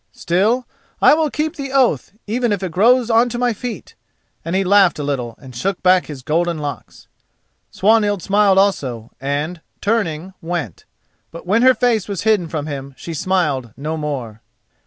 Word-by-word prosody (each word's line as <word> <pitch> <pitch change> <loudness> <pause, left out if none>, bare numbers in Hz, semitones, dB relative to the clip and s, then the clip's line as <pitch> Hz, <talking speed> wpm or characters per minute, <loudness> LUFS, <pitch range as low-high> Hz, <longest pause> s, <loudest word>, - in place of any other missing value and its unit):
Still, 215 +9 +1 0.3
I - - +6
will 310 0 +2
keep 305 +3 -2
the 275 -2 -5
oath 255 - +2
even 235 +2 0
if 200 -2 -1
it 185 - -3
grows 235 +6 +3
on 230 +2 +4
to 240 - -4
my 245 -1 +1
feet," 240 +2 -7 0.5
and 165 +2 -3
he 195 - +2
laughed 195 -1 +4
a 150 - -4
little 125 -5 -3
and 130 -3 -13
shook 190 +10 -2
back 185 0 +4
his 140 -4 -8
golden 170 +3 0
locks. 145 -2 -7 0.6
Swanhild 205 -2 +2
smiled 200 -1 +3
also 130 - 0
and, 145 +5 -3 0.2
turning, 190 -5 -1
went. 165 - -4 0.4
But 170 - -11
when 210 +6 +2
her 255 0 +6
face 235 -5 +1
was 200 -4 -4
hidden 210 -6 +2
from 155 -2 -4
him 140 -2 -6
she 170 - -7
smiled 155 - -1
no 155 +3 -3
more. 130 -8 -5
185 Hz, 175 wpm, -19 LUFS, 150-220 Hz, 0.6 s, I